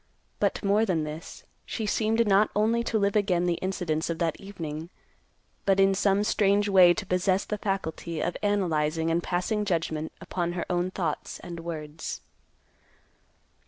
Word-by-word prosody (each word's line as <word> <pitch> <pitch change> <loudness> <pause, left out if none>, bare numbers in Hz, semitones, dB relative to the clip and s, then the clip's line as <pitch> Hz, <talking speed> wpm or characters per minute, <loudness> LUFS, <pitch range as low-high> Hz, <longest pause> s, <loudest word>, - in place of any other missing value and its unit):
But - - 0
more 205 +2 +3
than 180 -7 +1
this, 155 +2 -7 0.2
she 220 - -4
seemed 225 +2 +2
not 200 +1 +4
only 225 +3 +2
to 225 - 0
live 200 -1 +1
again 190 -4 +2
the 175 -1 0
incidents 175 -4 -1
of 165 - -2
that 165 -1 -1
evening, 165 -5 -6 0.7
but 195 -1 +3
in 195 0 +5
some 200 +1 +2
strange 205 -1 +2
way 185 -3 +7
to 200 +3 -2
possess 185 +1 +1
the 210 - -3
faculty 170 -4 -3
of 175 - -1
analyzing 165 -6 +1
and 170 +1 +1
passing 180 +5 -1
judgment 160 -5 -1
upon 175 -1 -3
her 175 - -3
own 175 +1 +1
thoughts 170 -5 -3
and 170 -1 -7
words. 155 -2 -6
185 Hz, 160 wpm, -27 LUFS, 165-205 Hz, 0.7 s, way